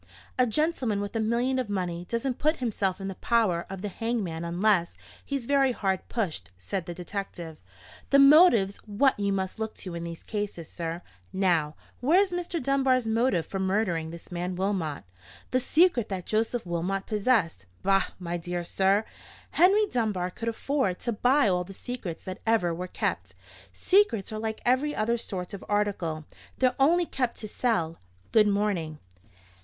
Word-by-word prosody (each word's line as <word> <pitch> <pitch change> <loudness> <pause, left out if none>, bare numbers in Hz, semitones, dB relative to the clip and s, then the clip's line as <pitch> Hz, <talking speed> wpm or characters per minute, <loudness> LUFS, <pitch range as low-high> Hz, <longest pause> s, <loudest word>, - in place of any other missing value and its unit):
"A 250 - +5
gentleman 255 -5 0
with 205 +2 -4
a - - +1
million 240 +4 +1
of 250 -5 -3
money 180 -3 -3
doesn't 240 +2 -2
put 310 +2 +2
himself 205 - -1
in 195 - -4
the 195 - -3
power 195 -5 +1
of 195 0 -7
the - - -1
hangman 200 -6 -3
unless 175 +1 +1 0.3
he's 275 -4 -3
very 275 -1 +3
hard 190 -4 -1
pushed," 160 - -3
said 130 - -4
the 175 - -4
detective. 175 -3 -6 0.5
"The 280 - +5
motive's 275 - +6
what 220 +4 +1
you 200 -1 +1
must 190 +1 -2
look 220 0 -3
to 185 - -7
in 170 0 -5
these 170 -1 -7
cases, 205 -6 -4
sir. 170 +1 -5 0.3
Now, 170 -6 +1 0.2
where's 360 +9 +3
Mr. 350 -1 -2
Dunbar's 265 -2 +2
motive 225 -6 +1
for 195 - -5
murdering 190 -4 0
this 170 +2 -10
man 180 +1 -3
Wilmot?" 185 -6 -2 0.5
"The 255 - +3
secret 300 - +3
that 185 -3 -4
Joseph 225 +1 0
Wilmot 180 +3 -2
possessed——" 200 - +1 0.2
"Bah, 195 0 +3
my 175 -1 -3
dear 175 +1 -4
sir! 195 +4 +2 0.5
Henry 395 +5 +5
Dunbar 210 - -1
could 230 +4 -3
afford 230 -5 -1
to 240 - -1
buy 250 +4 +3
all 180 -2 +1
the 195 +2 -11
secrets 230 -10 -6
that 185 0 -6
ever 215 -7 +2
were 180 +2 -4
kept. 95 - -3 0.4
Secrets 225 - +2
are 215 - -3
like 220 0 -3
every 260 +5 +2
other 235 +2 0
sort 185 -4 -5
of 195 - -7
article: 190 -7 -1 0.3
they're 255 -1 +3
only 340 +6 +4
kept 250 -6 -2
to 215 - -5
sell. 175 -8 -1 0.3
Good 215 -2 +5
morning." 200 -7 0
205 Hz, 170 wpm, -27 LUFS, 180-245 Hz, 0.5 s, motive's